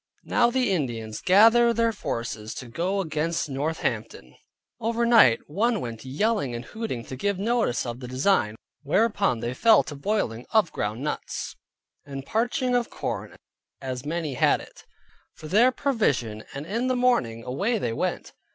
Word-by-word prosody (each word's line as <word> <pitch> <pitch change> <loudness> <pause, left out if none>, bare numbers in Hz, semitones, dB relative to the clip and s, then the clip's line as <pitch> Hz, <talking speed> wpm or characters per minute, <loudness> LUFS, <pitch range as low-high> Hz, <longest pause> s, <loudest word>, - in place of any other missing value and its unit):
Now 240 -1 +3
the 250 -3 +1
Indians 115 - -2
gather 230 +5 +6
their 230 0 +2
forces 115 - -5
to 125 - -7
go 180 +11 -1
against 160 -1 -1
Northampton. 145 +4 -3 0.5
Over 230 +1 0
night 225 - +6
one 220 +8 0
went 115 -5 -5
about 130 - -8
yelling 200 - 0
and 120 - -6
hooting 220 - -5
to 130 - -7
give 200 +8 -1
notice 220 - 0
of 120 0 -5
the 125 - -7
design. 130 - +1 0.3
Whereupon 195 - +1
they 120 +1 -2
fell 220 - +5
to - - -7
boiling 140 - -2
of 215 -6 +3
ground 105 +5 -3
nuts, 150 - -4 0.5
and 135 -1 -7
parching 245 - 0
of 245 -1 +1
corn - - -5 0.4
(as 130 -2 -5
many 155 -1 -3
as - - -8
had - - +4
it) - - -15 0.5
for 155 - -10
their 225 +9 +5
provision; 145 - -1
and 140 +2 -6
in 230 +8 -1
the 255 - +1
morning 185 - +1
away 195 - -1
they 120 - -2
went. - - -3
165 Hz, 165 wpm, -25 LUFS, -, 0.5 s, gather